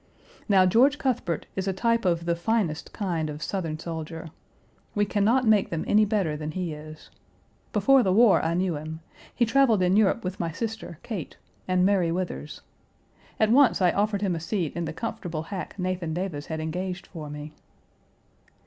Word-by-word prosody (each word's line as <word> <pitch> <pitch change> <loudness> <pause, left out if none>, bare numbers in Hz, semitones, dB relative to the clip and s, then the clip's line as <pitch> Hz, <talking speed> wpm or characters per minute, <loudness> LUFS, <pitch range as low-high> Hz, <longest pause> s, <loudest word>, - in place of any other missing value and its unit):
Now 190 -2 +6
George 255 +10 +4
Cuthbert 220 - -1
is 190 0 -2
a 195 - +1
type 230 +3 +1
of 170 -2 +1
the 170 0 +1
finest 175 -3 -1
kind 170 -6 -2
of 150 +2 -6
Southern 165 -6 -3
soldier. 165 0 -6 0.6
We 205 0 +3
can 205 0 0
not 245 +5 +3
make 215 -3 +4
them 165 -1 -3
any 215 +1 +5
better 195 -7 0
than 150 0 -5
he 180 -3 -3
is. 155 +1 -11 0.6
Before 270 -1 +5
the 190 - +1
war 225 +2 +5
I 165 +1 0
knew 180 -2 0
him; 155 +2 -7 0.3
he 240 - +3
traveled 230 -5 +3
in 180 +1 +3
Europe 215 +2 +3
with 185 0 -4
my 170 -1 -1
sister, 220 -2 -5
Kate, 200 -10 -6 0.3
and 185 0 +3
Mary 190 -4 +2
Withers. 175 -4 -4 0.8
At 220 0 +3
once 270 0 +5
I 180 -2 +4
offered 205 0 0
him 190 -3 +1
a 165 - -2
seat 170 -1 -2
in 170 -1 -2
the 160 - -3
comfortable 160 0 -4
hack 185 +3 -6
Nathan 180 -3 -2
Davis 175 -5 -4
had 160 -1 -4
engaged 180 +3 -4
for 155 -4 -8
me. 150 +1 -8
185 Hz, 185 wpm, -26 LUFS, 160-210 Hz, 0.8 s, Now